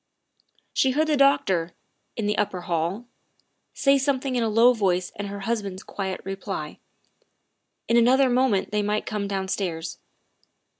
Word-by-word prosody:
She 260 -1 +2
heard 310 - +3
the 310 -1 +1
doctor, 190 -12 +2 0.4
in 220 - -3
the 210 0 +1
upper 195 -4 -1
hall, 175 +6 -2 0.7
say 275 0 +3
something 265 -1 0
in 245 - +1
a 225 - +1
low 230 +3 +5
voice 185 -5 0
and 205 0 -5
her 200 0 -6
husband 200 -3 -3
's - - -13
quiet 190 -2 -4
reply. 195 0 -5 1.1
In 235 - +3
another 260 +3 +5
moment 245 -7 +1
they 210 0 +1
might 210 +1 -1
come 210 -2 -3
downstairs. 190 -4 -3
210 Hz, 150 wpm, -25 LUFS, 190-250 Hz, 1.1 s, low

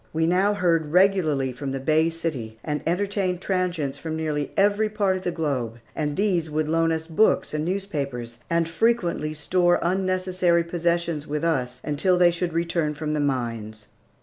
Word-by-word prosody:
We 160 +1 +1
now 190 +4 +2
heard 165 -5 +1
regularly 170 -8 +3
from 135 +2 -5
the 135 - -2
Bay 155 +4 +2
City, 145 -10 -4
and 150 -1 -2
entertained 185 0 0
transients 175 -7 -1
from 160 -1 -4
nearly 150 -2 -2
every 205 +2 +3
part 205 -3 +1
of 185 - -4
the 180 - -2
globe; 130 -8 -2 0.2
and 150 -2 -2
these 180 -6 +1
would 155 0 -1
loan 165 +1 +2
us 160 0 -2
books 180 +2 +2
and 150 0 -1
newspapers, 140 -11 -3
and 170 -1 +1
frequently 170 -5 0
store 175 +3 +2
unnecessary 185 -1 +1
possessions 170 -2 -1
with 150 +1 -3
us 125 -6 -1
until 155 +5 +1
they 175 -1 +5
should 175 0 -2
return 165 -2 -1
from 150 0 -3
the 150 - 0
mines. 115 -6 -2
165 Hz, 170 wpm, -24 LUFS, 150-180 Hz, 0.2 s, they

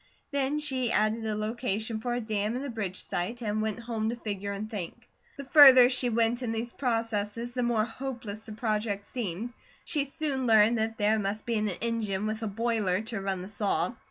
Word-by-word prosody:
Then 280 +1 0
she 260 -5 0
added 220 +1 +1
a 215 - -1
location 220 0 -2
for 240 +2 -2
a - - -1
dam 215 -1 -1
and 265 +3 -3
a 275 - -4
bridge 200 -5 -4
site, 230 +8 -3
and 215 0 -1
went 220 +1 -2
home 225 -2 -2
to 235 - -2
figure 205 -4 -4
and 200 +2 -4
think. 215 +3 -6 0.3
The 280 - -6
further 265 -3 +9
she 250 -1 +1
went 230 +1 +1
in 240 -3 -2
these 230 +1 -3
processes 230 -1 -2
the 250 - -1
more 235 -3 +2
hopeless 230 -3 -6
the 220 -1 -9
project 210 -2 -1
seemed. 225 0 -4 0.3
She 295 -4 0
soon 275 -3 -2
learned 220 +1 +5
that 225 0 -1
there 215 +1 +2
must 205 +1 -3
be 235 - -1
an 210 0 0
engine 215 -1 -2
with 215 +1 -3
a 225 - -2
boiler 215 -3 0
to 220 -2 -4
run 190 -2 -2
the - - -7
saw. 210 +3 0
225 Hz, 205 wpm, -29 LUFS, 210-240 Hz, 0.3 s, further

